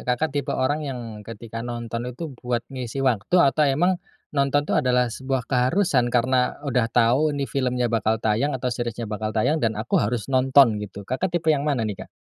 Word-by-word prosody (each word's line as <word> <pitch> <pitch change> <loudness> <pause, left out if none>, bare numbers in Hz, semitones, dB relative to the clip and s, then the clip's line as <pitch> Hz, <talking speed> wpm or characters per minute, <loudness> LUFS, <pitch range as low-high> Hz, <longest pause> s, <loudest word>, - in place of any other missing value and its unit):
Kakak 130 +4 -1
tipe 145 -2 -1
orang 145 +4 0
yang 135 -4 -4 0.2
ketika 115 +1 -8
nonton 120 0 -4
itu 145 +4 -7
buat 120 -1 -2
ngisi 130 0 -5
waktu 120 - +1
atau 150 -1 +4
emang 175 +7 +2 0.4
nonton 140 +1 +2
tuh - - +1
adalah 125 -1 +2
sebuah 130 -1 -2
keharusan 130 0 +2
karena 125 +1 +1
udah 125 -4 +1
tahu 125 +7 +3
ini 140 - -1
filmnya 125 -2 0
bakal 110 -1 +1
tayang 110 +7 +1
atau 125 0 -2
seriesnya 120 0 -3
bakal 110 0 -3
tayang 115 +9 +1
dan 115 - +2
aku 110 - -3
harus 110 +1 -1
nonton 130 -2 +5
gitu, 100 0 -8
Kakak 170 +9 -1
tipe 160 -1 -4
yang 140 - -2
mana 140 -7 0
nih 105 -3 -5
Kak? - - -21
125 Hz, 190 wpm, -24 LUFS, 115-140 Hz, 0.4 s, nonton